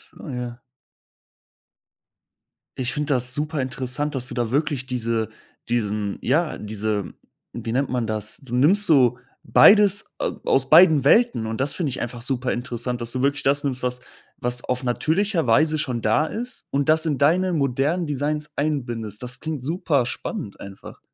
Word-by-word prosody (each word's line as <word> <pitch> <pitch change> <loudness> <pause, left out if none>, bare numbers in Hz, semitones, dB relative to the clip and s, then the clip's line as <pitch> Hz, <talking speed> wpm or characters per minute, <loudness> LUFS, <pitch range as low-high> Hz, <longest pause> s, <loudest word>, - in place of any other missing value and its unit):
Ah, - - -10
ja. 125 -1 -6 2.2
Ich 125 -1 -1
finde 150 -1 0
das 125 0 0
super 150 +1 -3
interessant, 130 +2 -2
dass 125 -2 -2
du - - -7
da 120 -2 -2
wirklich 145 -2 -1
diese 115 -3 -2 0.4
diesen 105 -3 -2
ja, 155 +5 0
diese, 105 -2 -3 0.4
wie 115 - -5
nennt 135 +3 0
man 125 -2 -1
das? 110 -1 -2
Du 125 -2 -5
nimmst 185 +11 +6
so 125 - +4 0.3
beides 205 -1 +5
a - - -1
aus 135 0 +3
beiden 160 -4 +7
Welten, 215 - +3
und 110 +2 -4
das 135 +2 +1
finde 165 -6 -2
ich 130 - -5
einfach 120 0 -5
super 125 0 -1
interessant, 120 0 -2
dass 120 0 -1
du 130 +1 -2
wirklich 140 +1 +1
das 140 +1 +1
nimmst, 130 -3 -2
was 125 0 -1 0.4
was 125 0 -1
auf 125 +1 -2
natürlicher 165 - 0
Weise 155 +7 +3
schon 125 -5 -2
da 110 +9 +2
ist 240 +5 -6
und 140 0 -1
das 160 +1 +3
in 150 -3 0
deine 175 +7 +2
modernen 145 +3 0
Designs 150 +1 -3
einbindest. 120 -8 -3
Das 125 0 -4
klingt 155 -5 -5
super 150 -4 0
spannend 130 - -6
einfach. 100 0 -11
130 Hz, 170 wpm, -22 LUFS, 120-155 Hz, 2.2 s, beiden